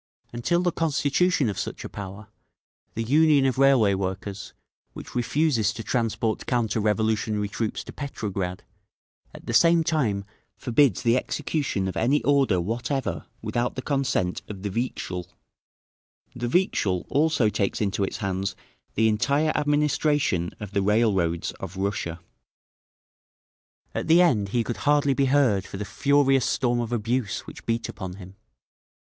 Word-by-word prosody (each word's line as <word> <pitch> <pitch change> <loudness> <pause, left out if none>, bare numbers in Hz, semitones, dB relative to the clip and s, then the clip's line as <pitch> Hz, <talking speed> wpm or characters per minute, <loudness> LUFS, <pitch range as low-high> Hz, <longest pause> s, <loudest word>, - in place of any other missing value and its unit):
Until 170 +10 0
the 175 - +2
constitution 155 -1 +1
of 100 - -3
such - - -5
a - - -3
power, 100 +1 -8 0.7
the 115 - -1
Union 145 +2 +4
of 130 0 0
Railway 135 -7 +5
Workers, 95 +1 -4 0.4
which - - -10
refuses 125 -3 +1
to 115 - -7
transport 115 -2 -1
counter 115 -3 0
revolutionary 105 0 0
troops 110 +1 -3
to - - -10
Petrograd, 100 -10 -4 0.7
at - - -13
the - - -3
same 170 -1 +5
time 115 -12 0 0.3
forbids 125 +2 +2
the 120 0 +4
execution 135 -7 -2
of 95 - -4
any 130 +3 +2
order 135 -8 +3
whatever 120 +8 -2 0.2
without 120 +1 -1
the 130 - -5
consent 135 -10 0
of 100 -2 -8
the 100 - -2
Vikzhel. 95 -6 -3 1.1
The 120 0 -3
Vikzhel 120 - +1
also 145 -6 +2
takes 100 -2 -1
into 100 -1 0
its 95 - -3
hands 100 -1 -2 0.4
the 110 +1 +3
entire 140 +8 +2
administration 145 - +1
of 105 -3 -7
the 100 -1 +1
railroads 95 -5 +1
of 95 0 -7
Russia." 95 -3 -2 1.7
At - - -3
the 165 +2 +6
end 105 - +2
he 120 +2 +1
could 120 - -4
hardly 145 -1 +2
be 135 +1 +2
heard 130 -8 +2
for - - -7
the 105 - -4
furious 135 +1 +2
storm 120 -2 +1
of 120 -1 -3
abuse 120 -1 -1
which - - -12
beat 115 -1 0
upon 95 -4 -6
him. 95 -1 -12
115 Hz, 145 wpm, -25 LUFS, 100-140 Hz, 1.7 s, the